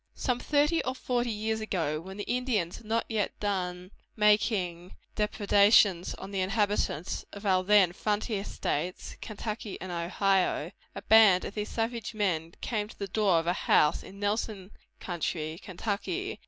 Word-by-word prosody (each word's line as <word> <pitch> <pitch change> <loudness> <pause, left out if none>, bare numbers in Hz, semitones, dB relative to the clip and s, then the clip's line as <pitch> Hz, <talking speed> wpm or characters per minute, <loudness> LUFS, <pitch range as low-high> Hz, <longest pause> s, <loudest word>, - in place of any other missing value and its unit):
Some 250 -2 -1
thirty 295 +4 +2
or 255 - -2
forty 245 -2 -1
years 220 0 -2
ago, 165 -8 -1
when 190 +3 -9
the 205 - -3
Indians 240 -9 -1
had 225 - -14
not 225 +1 0
yet 220 -3 -2
done 180 -2 -3 0.2
making 200 -5 +1 0.2
depredations 205 -3 +3
on 195 - -9
the 195 - -2
inhabitants 195 -4 0
of 200 +1 -9
our 185 -2 +3
then 195 -3 +5
frontier 210 +1 -1
states, 175 -1 -3
Kentucky 215 -1 -5
and 185 - -6
Ohio, 180 -1 +1 0.2
a - - -7
band 215 -4 +6
of - - -6
these 210 0 -4
savage 230 0 -3
men 170 -6 -1
came 210 -3 -2
to - - -14
the 200 - -4
door 195 -2 +2
of 165 - 0
a 175 - +2
house 150 -4 +3
in 195 - -12
Nelson 205 -1 -2 0.3
county, 160 -2 -3 0.4
Ky. 385 +2 -4
205 Hz, 155 wpm, -29 LUFS, 180-220 Hz, 0.4 s, band